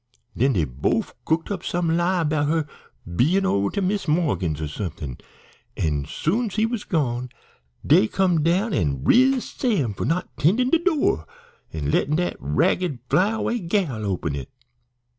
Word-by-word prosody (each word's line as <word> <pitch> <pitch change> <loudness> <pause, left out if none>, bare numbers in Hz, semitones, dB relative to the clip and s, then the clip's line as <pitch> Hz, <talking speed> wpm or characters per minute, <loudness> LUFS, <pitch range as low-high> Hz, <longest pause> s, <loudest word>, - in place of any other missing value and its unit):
"Den 135 +3 +2
dey 85 -7 +1
bofe 65 +1 -1
cooked 165 +4 0
up 190 -4 -3
some 170 -2 0
lie' 175 +1 +1
bout 150 -1 +1
her 160 0 +1 0.4
bein' 150 - +1
over 100 - +1
to 200 - -2
Mis' 200 0 -1
Morgan's 145 - 0
or 80 - -3
somethin', 75 - -6 0.6
an' 75 -3 -1
as - - -16
soon 220 +8 0
's - - -9
he 215 +1 +2
was 225 -2 -3
gone 125 -6 -1 0.6
dey 110 - +5
come 180 - +1
down 180 +7 +1
an' 70 -6 0
riz 260 - +4
Sam 190 - 0
for - - -4
not 170 +3 -2
'tendin' 220 - +2
de 335 - +4
door 295 - +1 0.4
an' 75 -2 -2
lettin' 150 +3 +1
dat 175 +2 0
ragged 125 - +1
fly 180 +8 +4
away 225 +2 -1
gal 170 - -1
open 90 -7 -2
it. 70 -3 -6
160 Hz, 170 wpm, -23 LUFS, -, 0.6 s, dey